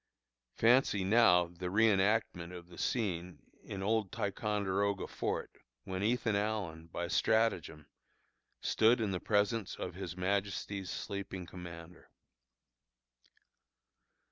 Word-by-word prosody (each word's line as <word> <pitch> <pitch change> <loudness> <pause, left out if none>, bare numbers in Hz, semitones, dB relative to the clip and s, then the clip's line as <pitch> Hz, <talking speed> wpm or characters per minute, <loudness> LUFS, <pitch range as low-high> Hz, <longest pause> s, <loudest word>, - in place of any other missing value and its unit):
Fancy 115 -4 +4
now 95 -3 +5
the 85 +1 -7
reënactment 100 -3 +2
of 85 0 -13
the 85 - -13
scene 90 - -1 0.3
in 95 -1 -5
old 110 -1 +1
Ticonderoga 100 -1 -1
fort, - - -3 0.3
when 95 0 -4
Ethan 115 0 +1
Allen, 100 -6 -2
by 85 +1 -4
stratagem, 90 -7 +1 0.8
stood 115 +3 +4
in 110 -3 0
the 90 - -1
presence 105 +1 +1
of - - -5
His 90 - -6
Majesty's 100 0 -2
sleeping 95 -2 -5
commander. 85 -1 -10
100 Hz, 105 wpm, -33 LUFS, 90-110 Hz, 0.8 s, now